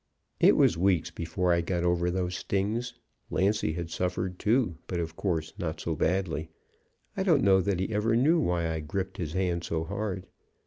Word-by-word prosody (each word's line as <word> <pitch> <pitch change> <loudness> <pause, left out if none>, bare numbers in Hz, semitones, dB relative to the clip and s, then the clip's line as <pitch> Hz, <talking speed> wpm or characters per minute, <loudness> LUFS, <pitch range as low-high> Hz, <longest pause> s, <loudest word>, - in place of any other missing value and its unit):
"It - - +6
was 80 - +4
weeks 90 -3 +2
before 85 +2 0
I 85 - +2
got 85 +1 -1
over 85 0 +2
those 90 0 -1
stings. 105 +7 -2 0.3
Lancy 95 -4 +1
had 85 0 -5
suffered, 90 0 -2
too, 110 -6 +1
but 90 - -2
of 80 -1 -4
course 80 -5 -2
not 80 -2 -3
so 80 0 -2
badly. 80 -2 0 0.7
I 195 - -1
don't 165 -8 +3
know 95 -1 +5
that 95 0 0
he 95 +4 -2
ever 110 +2 +2
knew 155 +8 +4
why 85 - +1
I 80 -1 -2
gripped 95 +5 -4
his 80 -3 -4
hand 90 -2 0
so 80 -1 -2
hard. 95 +2 -4
90 Hz, 185 wpm, -28 LUFS, 85-100 Hz, 0.7 s, It